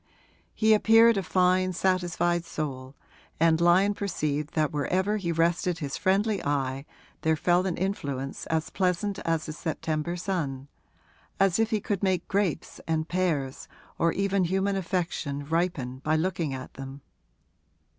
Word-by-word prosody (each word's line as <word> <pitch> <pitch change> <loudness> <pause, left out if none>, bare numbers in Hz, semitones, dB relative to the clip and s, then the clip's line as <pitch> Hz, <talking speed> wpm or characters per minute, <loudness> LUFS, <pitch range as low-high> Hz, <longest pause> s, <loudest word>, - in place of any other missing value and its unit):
He 220 0 +4
appeared 225 +2 +6
a 195 - +1
fine 185 +1 +2
satisfied 175 -2 +1
soul, 140 -5 -5 0.4
and 165 0 +4
Lyon 185 +4 +4
perceived 150 -7 -2
that 155 -2 +1
wherever 185 +8 0
he 175 -4 -2
rested 170 +1 +1
his 145 -4 -4
friendly 200 +2 +1
eye 135 -1 -1 0.3
there 160 0 +2
fell 175 +3 +2
an 175 - -2
influence 140 -8 -3
as 160 0 -1
pleasant 190 +2 0
as 165 -1 -1
the 155 - -5
September 160 +1 -3
sun 145 -7 -3 0.7
as 195 0 +3
if 225 0 +2
he 220 -2 +1
could 200 -1 -2
make 185 -3 0
grapes 195 -5 -1
and 160 -1 0
pears 155 -7 -1 0.3
or 170 - +3
even 195 0 +1
human 190 +3 0
affection 165 -6 -2
ripen 155 -6 -1
by 155 +3 0
looking 165 -2 -1
at 130 -1 -7
them. 135 +1 -8
170 Hz, 145 wpm, -27 LUFS, 150-190 Hz, 0.7 s, appeared